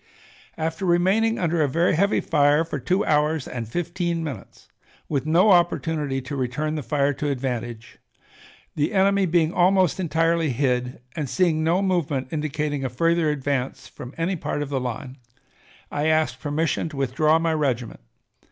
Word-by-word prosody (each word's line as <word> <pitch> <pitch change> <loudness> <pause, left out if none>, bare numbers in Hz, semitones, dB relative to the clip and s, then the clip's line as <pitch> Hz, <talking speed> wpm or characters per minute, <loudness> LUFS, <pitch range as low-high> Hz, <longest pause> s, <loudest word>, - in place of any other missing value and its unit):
"After 160 +3 -3
remaining 190 +6 +2
under 170 -2 0
a 150 - +3
very 165 +6 +2
heavy 200 +6 +2
fire 150 +1 +3
for 150 -3 -4
two 180 +11 0
hours 150 -1 +1
and 115 -3 -5
fifteen 170 - -2
minutes, 135 -10 -8 0.4
with 145 0 -2
no 180 +6 +5
opportunity 160 -6 +1
to 145 +3 -6
return 135 +4 -2
the 155 - -3
fire 140 +3 0
to 145 +2 -3
advantage, 120 -3 -4 0.8
the 150 +7 0
enemy 195 0 +3
being 165 -1 +2
almost 185 0 +3
entirely 165 -2 +1
hid, 125 -1 -1
and 150 -5 -3
seeing 165 -2 +1
no 175 +5 +2
movement 150 -9 -1
indicating 150 -2 -2
a 130 - -1
further 165 +5 +1
advance 140 -2 -2
from 125 - -10
any 170 +3 0
part 145 -3 -3
of 140 - -7
the 135 -2 -1
line, 125 +2 -6 0.7
I 145 +1 -1
asked 155 -5 +1
permission 155 +3 -1
to 150 - -10
withdraw 140 +4 +2
my 165 0 0
regiment. 130 -7 -1
155 Hz, 160 wpm, -23 LUFS, 135-170 Hz, 0.8 s, no